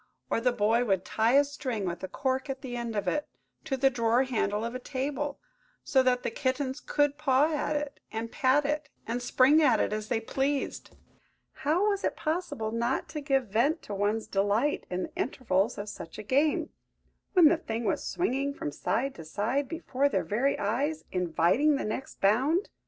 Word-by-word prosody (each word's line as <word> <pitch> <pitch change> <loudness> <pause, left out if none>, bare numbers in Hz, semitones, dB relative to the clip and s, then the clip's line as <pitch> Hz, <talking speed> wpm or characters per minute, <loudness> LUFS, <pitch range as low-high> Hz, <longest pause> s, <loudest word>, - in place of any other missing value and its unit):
Or - - +1
the 250 +1 +3
boy 230 +1 +2
would 195 -5 0
tie 225 +2 +2
a 285 - +7
string, 260 -7 -4
with 175 0 -4
a - - -2
cork 265 +5 -2
at 270 0 -4
the 255 -4 -5
end 235 -2 -4
of 205 - -2
it, 300 -1 0 0.4
to 270 -4 -1
the 270 +1 +4
drawer 235 +1 +2
handle 220 -4 -1
of 235 - -4
a 255 - -4
table, 280 +2 -3 0.4
so 265 -2 +3
that 250 -1 +2
the - - -1
kittens 260 +3 -1
could 290 0 0
paw 295 +1 +2
it, 295 -1 -3
and 225 +1 -4
pat 275 +2 +3
it, 300 +1 -1 0.2
and 240 +2 -2
spring 265 +5 +4
at 300 - +4
it, - - 0
as 215 0 -3
they 225 - 0
pleased–how 285 - -3
was 400 -1 0
it - - 0
possible 310 -9 -2
not 235 +9 -1
to 310 -2 -5
give 270 -5 +1
vent 275 - +1
to 205 - -6
one's 205 +2 0
delight 205 +9 0
in 180 0 -2
the 310 - -7
intervals 230 - 0
of 205 - -5
such 165 -5 -8
a - - -6
game, 280 +7 +1 0.6
when 355 -5 +8
the 340 - +4
thing 230 -7 -4
was - - 0
swinging 280 -4 -1
from 145 - -4
side 260 - -1
to 165 - -10
side 220 - -1
before 285 -4 0
their - - 0
very 245 +7 +1
eyes, 275 +10 -1
inviting 180 - +2
the 280 - -2
next 220 +5 -5
bound? 265 - +2
260 Hz, 190 wpm, -29 LUFS, 220-290 Hz, 0.6 s, when